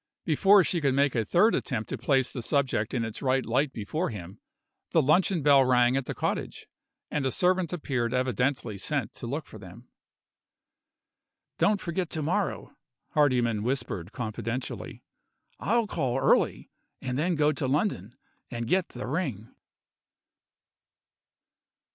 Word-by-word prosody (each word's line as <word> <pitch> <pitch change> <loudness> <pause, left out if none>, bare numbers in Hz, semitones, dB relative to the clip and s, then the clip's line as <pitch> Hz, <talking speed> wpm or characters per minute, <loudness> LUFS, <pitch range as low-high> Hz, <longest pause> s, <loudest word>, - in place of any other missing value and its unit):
Before 195 +5 +5
she 170 +1 -1
could 135 -3 +2
make 140 -1 +3
a 115 - +1
third 190 - +3
attempt 115 -5 -2
to - - -2
place 130 +1 +1
the 125 - -5
subject 130 -4 0
in 115 -2 0
its 110 - -6
right 130 -1 +1
light 135 +5 +1
before 145 - -3
him, 100 -2 -8 0.5
the - - +5
luncheon 160 +3 +3
bell 140 -2 +6
rang 125 -1 +3
at 135 -2 -1
the - - -4
cottage - - -3 0.5
and 150 - -1
a 135 - +1
servant 180 +3 +1
appeared 130 -9 -2
evidently 125 -3 -1
sent 135 0 -1
to 120 - -7
look 145 +6 -3
for 110 - -12
them. 100 +6 -13 1.7
"Don't 205 -1 +3
forget 175 -1 -3
to 155 - -3
morrow," 185 +6 -2 0.4
Hardyman 125 -7 +2
whispered 115 -7 -3
confidentially. 115 +2 -5 0.6
"I'll 235 +1 +1
call 135 -10 -1
early - - +2 0.3
and 125 -1 -4
then 170 +6 +1
go 150 0 +3
to 145 -3 -2
London, 130 - -1 0.3
and 120 -1 -4
get 185 +6 +1
the 125 - -7
ring." 130 - -3
135 Hz, 145 wpm, -27 LUFS, 120-160 Hz, 1.7 s, bell